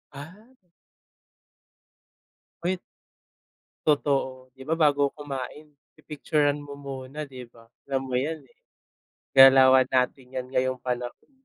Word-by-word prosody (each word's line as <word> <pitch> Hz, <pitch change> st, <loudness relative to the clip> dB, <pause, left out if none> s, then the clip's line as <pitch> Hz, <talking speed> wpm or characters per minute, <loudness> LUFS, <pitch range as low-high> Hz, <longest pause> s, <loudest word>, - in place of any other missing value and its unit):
Ah. 185 Hz, -, -12 dB, 2.1 s
Wait, 180 Hz, +1 st, -1 dB, 1.1 s
totoo, 135 Hz, -3 st, 0 dB
di 130 Hz, -, -11 dB
ba, 155 Hz, -, -3 dB
bago 145 Hz, -3 st, +2 dB
kumain 145 Hz, +1 st, -7 dB, 0.2 s
pipicturan 150 Hz, -1 st, -1 dB
mo 145 Hz, -, -10 dB
muna, 140 Hz, +2 st, -7 dB
di 130 Hz, -2 st, -10 dB
ba? 115 Hz, -1 st, -20 dB, 0.2 s
Alam 135 Hz, -1 st, -3 dB
mo 125 Hz, -, -1 dB
'yan, 155 Hz, +5 st, -2 dB
eh, 135 Hz, -3 st, -25 dB, 0.8 s
galawan 130 Hz, -1 st, +8 dB
natin 130 Hz, +1 st, +1 dB
'yan 130 Hz, -1 st, -4 dB
ngayong 130 Hz, -1 st, -1 dB
panahon. 125 Hz, -, -5 dB
135 Hz, 110 wpm, -26 LUFS, 130-150 Hz, 2.1 s, galawan